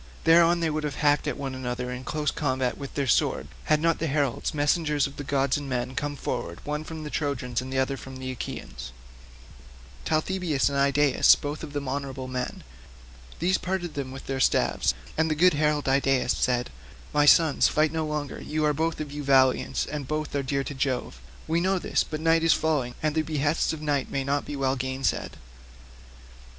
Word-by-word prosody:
Thereon 170 +1 +5
they 165 - +1
would 155 0 -2
have 145 -2 -3
hacked 150 0 +2
at 145 - -2
one 135 -2 -4
another 125 -1 -4
in 125 +1 -6
close 150 +1 -1
combat 130 -4 -1
with 140 -1 -8
their 140 - 0
swords, 70 - +1 0.2
had 155 -1 +3
not 165 0 +1
heralds, 145 -6 0
messengers 150 -1 +1
of 140 - -6
gods 140 -1 +1
and 145 -1 -6
men, 125 0 -2
come 145 +2 -3
forward, 85 -11 -4
one 150 +1 -2
from 160 0 -7
the 150 - -6
Trojans 135 -5 -2
and 130 +1 -7
the 135 - -2
other 130 +1 +1
from 130 +2 -9
the 130 0 -5
Achaeans—Talthybius 60 - -4
and 140 - -2
Idaeus 140 0 +5
both 145 +1 -5
of 150 -3 -7
them 145 -1 -3
honourable 135 -1 -4
men; 125 -1 -4 0.7
these 185 +3 +1
parted 180 -3 -3
them 135 -2 -4
with 135 0 -9
their 135 0 -3
staves, 60 - +2 0.2
and 160 0 +3
the 155 - +1
good 180 +3 +5
herald 150 -1 +1
Idaeus 135 -1 +2
said, 125 - 0 0.4
"My 150 0 +4
sons, 160 -1 +6
fight 155 0 +2
no 160 0 -1
longer, 150 -2 -4
you 155 0 -1
are 150 - +3
both 160 +2 -1
of 150 -2 -5
you 145 0 -5
valiant, 130 -2 +3
and 145 -3 -5
both 155 +1 -3
are 140 - +1
dear 140 +1 -1
to 145 - -5
Jove; 130 - -2 0.3
we 165 +1 +1
know 190 +2 +2
this; - - 0
but 155 - -5
night 165 +1 +3
is 165 - +5
now - - -3
falling, 145 -6 0
and 155 -1 +1
the 160 - +2
behests 155 0 0
of 155 -1 -6
night 145 -3 0
may 140 - -1
not 140 +1 -1
be 145 - -5
well 135 -1 0
gainsaid." 130 +1 -2
140 Hz, 200 wpm, -26 LUFS, 130-155 Hz, 0.7 s, sons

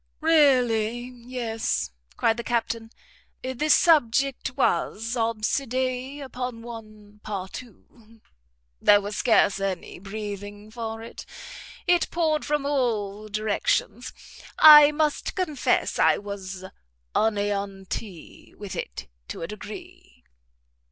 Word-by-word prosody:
"Really 250 -7 +3
yes," 235 - -3 0.3
cried 225 0 +2
the 235 - -4
Captain; 230 -1 -2 0.5
"the 260 +4 -2
subject 275 -4 +3
was 230 +2 0
obsedé 255 +4 -1
upon 250 -3 -6
one 215 -3 -11
partout. 210 +4 -7 1.0
There 205 0 +6
was 205 +1 -5
scarce 220 -4 +3
any 195 -3 -4
breathing 205 +1 -7
for 225 -1 -5
it; 230 - -10 0.6
it 350 -1 +3
poured 315 -3 0
from 295 -1 -1
all 215 -7 -1
directions; 215 +3 -1 0.5
I 300 -1 +10
must 300 -1 -1
confess 315 -7 0
I - - +5
was 195 -2 -7 0.5
aneanti 200 -3 -3
with 205 -3 -7
it - - -6 0.2
to - - -6
a - - -3
degree." 210 - -11
225 Hz, 100 wpm, -25 LUFS, 205-260 Hz, 1.0 s, I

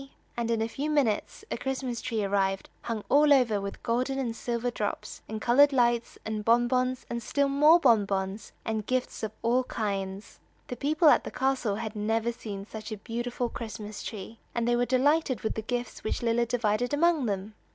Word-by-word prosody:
And 235 -1 -2
in 225 -1 +1
a - - -1
few 280 +6 -3
minutes 270 -9 0
a - - -1
Christmas 260 -2 -3
tree 225 -4 -2
arrived 195 -1 0
hung 225 -3 -4
all 295 +1 +5
over 235 -7 +4
with 200 0 -6
gold 245 +3 0
and 265 -4 -2
silver 240 +1 -2
drops, 210 -3 -4
and 220 0 -4
colored 275 +6 +5
lights, 240 -3 +1
and 215 -1 -3
bonbons, 250 +2 +2
and 235 0 -4
still 280 +5 +1
more 300 +5 +6
bonbons, 200 - +1
and 220 -2 -2
gifts 255 0 -1
of 220 -2 -3
all 245 +3 +3
kinds. 200 -3 -4 0.3
The 250 - -3
people 300 +5 +3
at - - +5
the - - -5
castle 260 -5 0
had 220 0 -5
never 225 +2 0
seen 200 -4 -7
such 215 +1 -8
a 215 - -4
beautiful 240 +3 -3
Christmas 215 -3 -7
tree, 220 +1 -7 0.2
and 235 -1 0
they 240 - +3
were 245 0 +1
delighted 275 0 +2
with 220 - -1
the 220 - -3
gifts 245 +1 -4
which 215 - -2
Lilla 235 0 +2
divided 240 +2 0
among 320 -4 +3
them. 200 +1 -3
235 Hz, 190 wpm, -28 LUFS, 215-255 Hz, 0.3 s, more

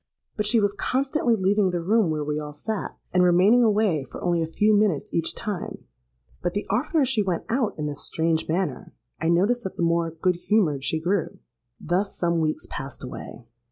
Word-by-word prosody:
But 210 -1 -1
she 230 +1 +4
was 205 -1 +1
constantly 260 +2 0
leaving 195 0 +2
the 175 -1 -1
room 210 0 +3
where 155 -1 -1
we 150 +1 -2
all 150 -1 -7
sate, 210 +8 -4 0.2
and 180 - +4
remaining 185 +7 +5
away 210 -9 +2
for - - -8
only 175 -1 +1
a 160 - -1
few 210 +6 +2
minutes 205 -8 +2
each 165 -1 -1
time; 205 -5 -5 0.6
but 175 +1 -2
the 205 - -2
oftener 280 - +2
she 245 -4 +2
went 185 -4 -1
out 235 -2 0
in 150 - -3
this 145 -1 -1
strange 160 0 0
manner, 170 -4 -2 0.2
I 160 - 0
noticed 205 +8 +2
that 190 - -6
the - - 0
more 170 0 +1
good 170 +2 0
humoured 175 -8 +1
she 160 - 0
grew. 175 +2 -1 0.4
"Thus 185 +5 -1
some 170 -1 +1
weeks 155 0 -1
passed 140 -1 -7
away. 125 -1 -8
180 Hz, 195 wpm, -25 LUFS, 160-210 Hz, 0.6 s, remaining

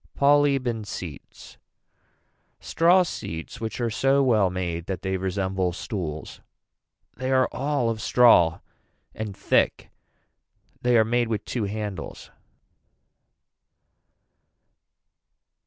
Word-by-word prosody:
Polybe 140 -2 +3
and 110 -3 -3
seats. 85 -8 -9 1.0
Straw 175 +3 +3
seats 80 - -7
which 110 +1 -4
are 120 -2 -1
so 135 +4 +2
well 110 -7 +3
made 85 -2 -4
that 95 -2 -4
they 95 0 -1
resemble 95 -1 -1
stools. 85 -6 -6 0.8
They 130 +1 -3
are 130 -1 +3
all 140 -2 -1
of 110 -1 -5
straw 95 -11 +4 0.5
and 105 -3 -6
thick. - - +1 0.9
They 120 -1 +3
are 110 - +4
made 120 +1 +1
with 110 -2 -3
two 120 -4 -2
handles. 105 -4 -6
110 Hz, 105 wpm, -25 LUFS, 95-130 Hz, 1.0 s, straw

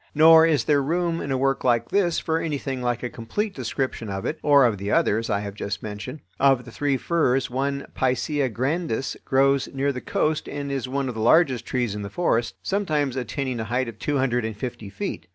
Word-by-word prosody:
Nor 160 +1 +8
is 150 -7 +2
there 145 +4 +3
room 170 +3 0
in - - -5
a 130 - +1
work 135 +1 0
like 120 -2 +2
this 180 -4 +2
for 160 0 0
anything 140 -5 -3
like 120 -1 -1
a - - 0
complete 195 - -3
description 130 -3 -3
of 95 0 -4
it, 155 - -3
or 140 -2 +6
of 110 -5 +1
the 100 +1 -4
others 110 +2 +2
I 100 -2 0
have 100 -1 -5
just 100 0 -5
mentioned. 110 +7 -6 0.2
Of 135 -2 +3
the 120 - -10
three 140 +2 0
firs, 135 -6 +1
one 140 +2 -2
(Picea 130 +1 0
grandis), 135 +1 -1
grows 135 0 +2
near 140 +1 0
the 125 - -5
coast 155 0 -1
and 140 -1 -4
is 135 -2 -3
one 135 0 -1
of 125 - -3
the 110 - -4
largest 130 -1 +3
trees 120 -5 -1
in 105 - -5
the 100 - -5
forest, 120 - 0
sometimes 155 -9 0
attaining 130 0 -3
a 110 - -3
height 125 +3 -1
of 115 -2 -8
two 145 -1 -1
hundred 125 -3 +1
and 110 -2 -4
fifty 120 -3 -6
feet. 100 - -5
130 Hz, 220 wpm, -24 LUFS, 120-145 Hz, 0.2 s, Nor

